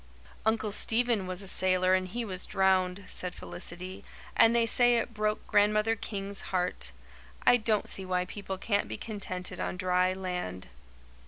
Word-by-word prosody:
"Uncle 220 -1 +1
Stephen 225 -2 +2
was 185 +1 -2
a - - -6
sailor 185 0 +4
and 185 0 +1
he 235 +5 -4
was 185 -3 -6
drowned," 190 0 +1
said 180 -1 -3
Felicity, 180 +2 -6 0.3
"and 230 +1 +5
they 235 -1 +4
say 245 +1 +4
it 230 0 -1
broke 215 0 -1
Grandmother 210 +2 +3
King's 200 -2 -5
heart. 180 - -2 0.5
I 245 - +7
don't 215 -2 +1
see 190 - -1
why 180 -1 -1
people 195 0 -6
can't 200 +1 0
be 110 - -5
contented 195 -4 -5
on - - -3
dry 185 0 +2
land." 180 - -5
190 Hz, 160 wpm, -29 LUFS, 185-215 Hz, 0.5 s, I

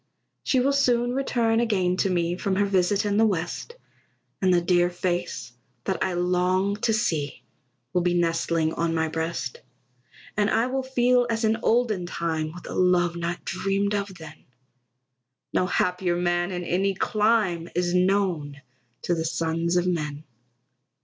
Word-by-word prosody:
She 260 - +1
will 275 +2 +2
soon 245 -3 +2
return 235 -4 +1
again 190 -6 +1
to 195 - +1
me, 175 -1 0
From 190 +1 -1
her 205 +1 +2
visit 195 +1 +1
in 205 0 +1
the 225 - +5
West, 180 - -3 0.7
And 190 -1 +3
the 175 - +5
dear 175 0 +2
face 175 -9 -3 0.3
that 190 - -1
I 185 - -1
long 180 +2 +1
to 225 - 0
see 155 - -1 0.5
Will 180 - +2
be 175 0 +1
nestling 165 -1 +1
on 165 0 -1
my 160 0 +1
breast. 160 -5 -3 0.7
And 210 0 +2
I 230 - +2
will 265 +1 -1
feel 250 -1 +2
as 225 0 -1
in 220 +1 +2
olden 220 -6 +1
time, 160 -2 -2
With 175 +2 -11
a - - -6
love 180 -1 +2
not 170 +1 -4
dreamed 195 +3 -1
of 200 -2 -2
then; 160 -2 -12 1.1
No 185 - +2
happier 180 -1 0
man 175 +1 0
in 180 -1 -3
any 190 +3 0
clime 210 -5 +1
Is 175 0 0
known 180 -6 +1 0.4
to 175 - +1
the 165 -1 -1
sons 165 +1 0
of 175 - +2
men. 150 -4 -2
180 Hz, 160 wpm, -25 LUFS, 170-205 Hz, 1.1 s, the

